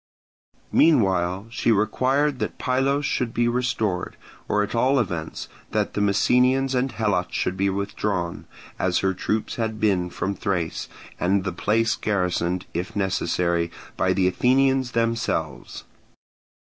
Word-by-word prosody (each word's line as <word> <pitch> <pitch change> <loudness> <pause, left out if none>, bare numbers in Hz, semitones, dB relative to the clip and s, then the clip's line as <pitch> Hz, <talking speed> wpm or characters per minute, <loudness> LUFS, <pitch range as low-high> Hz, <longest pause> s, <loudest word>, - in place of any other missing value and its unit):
Meanwhile 95 - +3
she 115 - +1
required 130 +7 +1
that - - -3
Pylos 135 +2 +1
should 125 -4 -1
be 120 0 +2
restored, 110 -6 -1 0.3
or 105 0 +2
at 105 - -5
all 130 +4 +3
events 85 -8 -3 0.3
that - - 0
the 105 - -1
Messenians 125 +6 +3
and 130 +1 0
Helots 105 -6 -1
should 90 - 0
be 100 +1 +1
withdrawn, 100 -2 -2 0.3
as 90 -1 +1
her 95 - +2
troops 105 +4 -2
had 110 -2 -2
been 95 -5 +1
from 95 +3 -2
Thrace, 90 -4 -2 0.3
and 95 +2 +2
the 95 - -2
place 110 +5 +1
garrisoned, 90 -3 -1
if 90 +2 -4
necessary, 85 -3 0 0.3
by 95 - +1
the 95 0 +2
Athenians 130 +5 +2
themselves. 115 - -2
105 Hz, 130 wpm, -24 LUFS, 90-125 Hz, 0.3 s, Meanwhile